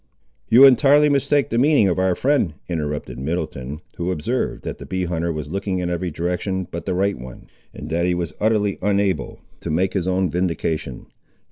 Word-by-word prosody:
"You 125 Hz, +4 st, +8 dB
entirely 140 Hz, +3 st, +6 dB
mistake 140 Hz, 0 st, +1 dB
the 115 Hz, -, +1 dB
meaning 140 Hz, -6 st, +4 dB
of 95 Hz, -1 st, 0 dB
our 95 Hz, -1 st, +2 dB
friend," 130 Hz, -, +1 dB
interrupted 75 Hz, -7 st, -4 dB
Middleton, 75 Hz, -1 st, -4 dB, 0.2 s
who 85 Hz, +1 st, -2 dB
observed, 110 Hz, +10 st, -2 dB
that -, -, -6 dB
the -, -, -9 dB
bee 95 Hz, 0 st, -2 dB
hunter 85 Hz, -1 st, -1 dB
was 75 Hz, -2 st, -5 dB
looking 100 Hz, 0 st, -2 dB
in 90 Hz, -1 st, -2 dB
every 90 Hz, +1 st, -2 dB
direction 90 Hz, +3 st, -2 dB
but 85 Hz, -, -6 dB
the 90 Hz, -, 0 dB
right 100 Hz, -1 st, 0 dB
one, 65 Hz, 0 st, -10 dB, 0.3 s
and -, -, -9 dB
that 85 Hz, +2 st, +1 dB
he 90 Hz, -, +1 dB
was 85 Hz, -3 st, -3 dB
utterly 105 Hz, -2 st, +1 dB
unable 100 Hz, -1 st, 0 dB, 0.2 s
to -, -, -6 dB
make 90 Hz, +5 st, 0 dB
his 95 Hz, -2 st, -1 dB
own 95 Hz, 0 st, +1 dB
vindication. 80 Hz, -6 st, -2 dB
90 Hz, 190 wpm, -21 LUFS, 85-105 Hz, 0.3 s, You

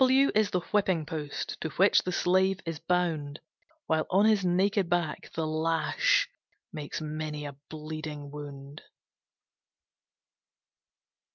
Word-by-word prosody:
W 260 Hz, +1 st, +6 dB
W -, -, +1 dB
is 215 Hz, -1 st, +3 dB
the 180 Hz, -, 0 dB
Whipping 190 Hz, -6 st, +2 dB
post, 150 Hz, -2 st, -5 dB
To 160 Hz, -, -2 dB
which 195 Hz, +3 st, +5 dB
the 180 Hz, -, -3 dB
slave 185 Hz, +1 st, +2 dB
is 165 Hz, -2 st, -4 dB
bound, 160 Hz, -4 st, -1 dB, 0.5 s
While 160 Hz, -1 st, +1 dB
on 195 Hz, +3 st, +4 dB
his 215 Hz, -3 st, +4 dB
naked 190 Hz, +1 st, +2 dB
back, 175 Hz, -3 st, -1 dB
the 160 Hz, -, -1 dB
lash 165 Hz, -, +2 dB, 0.5 s
Makes 150 Hz, -1 st, -5 dB
many 155 Hz, -1 st, -4 dB
a 140 Hz, -1 st, -6 dB
bleeding 155 Hz, -2 st, -6 dB
wound. 145 Hz, 0 st, -9 dB
160 Hz, 125 wpm, -29 LUFS, 150-190 Hz, 0.5 s, W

